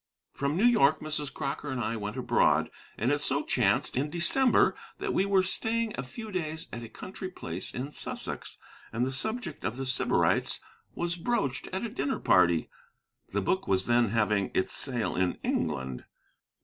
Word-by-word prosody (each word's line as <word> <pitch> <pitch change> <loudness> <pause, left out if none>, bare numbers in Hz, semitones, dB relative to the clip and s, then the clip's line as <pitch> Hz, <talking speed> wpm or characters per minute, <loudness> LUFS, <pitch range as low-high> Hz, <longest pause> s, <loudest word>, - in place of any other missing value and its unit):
From 140 +3 -1
New 210 - +4
York, 220 - +5
Mrs. 150 -2 -2
Crocker 145 0 -4
and 130 -2 -2
I 115 0 -1
went 105 +2 -4
abroad. 120 -2 +3 0.3
And 120 +5 +1
it 145 0 +1
so - - 0
chanced, - - +1
in 140 +4 0
December, 235 - +4 0.2
that - - -2
we 195 - +2
were 195 -2 +4
staying 225 +3 0
a - - -3
few 215 - -8
days 160 -3 -3
at 120 - -5
a 115 - -8
country 185 - -7
place 90 - -4
in 135 +4 -5
Sussex, - - -4 0.3
and 115 +2 0
the 130 - -2
subject 220 - -3
of 110 - -2
The 135 - -3
Sybarites 130 -4 +2 0.4
was 175 0 -1
broached 175 - -1
at 190 +5 -2
a - - -3
dinner 265 +4 -1
party. 85 -3 +4 0.6
The 100 - 0
book 190 - 0
was 95 -1 +2
then 120 -2 +3
having 105 -2 +1
its 95 - +1
sale 125 -5 0
in 90 0 +1
England. 65 -1 -2
140 Hz, 175 wpm, -29 LUFS, 115-185 Hz, 0.6 s, York